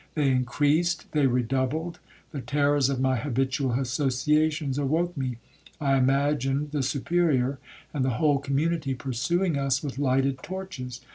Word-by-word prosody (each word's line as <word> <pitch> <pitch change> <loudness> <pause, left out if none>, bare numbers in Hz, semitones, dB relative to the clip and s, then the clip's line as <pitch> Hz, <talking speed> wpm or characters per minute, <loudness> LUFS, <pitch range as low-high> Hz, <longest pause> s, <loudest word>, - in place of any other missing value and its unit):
They 145 -4 +2
increased, 145 +7 +1
they 145 -3 +3
redoubled,—the 135 +5 -3
terrors 145 +1 +2
of 135 -2 -1
my 130 -1 +2
habitual 130 +1 -1
associations 140 +3 +1
awoke 165 +5 0
me. 130 -4 -3 0.4
I 140 -2 +2
imagined 140 +1 +1
the 150 -2 -1
Superior 140 -1 +1 0.3
and 140 -4 0
the 130 -3 0
whole 145 -2 +3
community 140 +1 -1
pursuing 145 +6 -1
us 135 0 0
with 140 -2 -5
lighted 135 -1 +1
torches. 155 -10 -6
140 Hz, 130 wpm, -26 LUFS, 130-150 Hz, 0.4 s, they